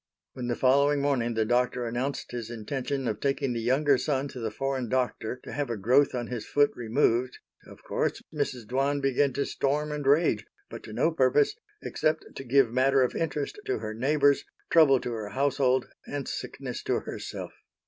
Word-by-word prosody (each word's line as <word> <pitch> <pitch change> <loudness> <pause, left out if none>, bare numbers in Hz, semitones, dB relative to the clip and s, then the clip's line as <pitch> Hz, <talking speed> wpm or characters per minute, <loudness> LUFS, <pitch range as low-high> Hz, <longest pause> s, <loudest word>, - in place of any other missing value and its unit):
When 125 -2 -5
the 120 - 0
following 140 +3 +3
morning 130 -5 0
the 110 0 +2
Doctor 125 +1 +1
announced 125 +4 -3
his 120 -2 -5
intention 130 +3 -3
of 110 -2 -2
taking 135 -1 0
the 115 - -2
younger 135 +3 +3
son 140 -1 0
to 130 - -8
the 115 -2 -2
foreign 130 +1 -2
Doctor 125 -1 -1
to - - -8
have 145 -2 -2
a 115 - -2
growth 130 +8 +3
on 120 -1 -2
his 120 -2 -5
foot 145 +4 +3
removed, 120 +1 +1 0.3
of - - -14
course, - - -1
Mrs. 135 -6 -2
Dwan 135 +5 0
began 135 0 +2
to 140 - -1
storm 150 +2 -1
and 150 -1 -3
rage 150 +5 +3 0.3
but - - -7
to - - -9
no - - +2
purpose, 430 -1 +3 0.3
except 155 0 -1
to - - -6
give 130 -2 +3
matter 135 +1 +4
of 125 - -1
interest 150 - -2
to 395 - 0
her 110 - -5
neighbors, 140 +4 +3 0.3
trouble 145 -5 +6
to 120 - -4
her 110 -3 -4
household, 130 +1 +1 0.2
and 145 -2 -4
sickness - - -5
to - - 0
herself. - - -6
135 Hz, 190 wpm, -28 LUFS, 120-145 Hz, 0.3 s, trouble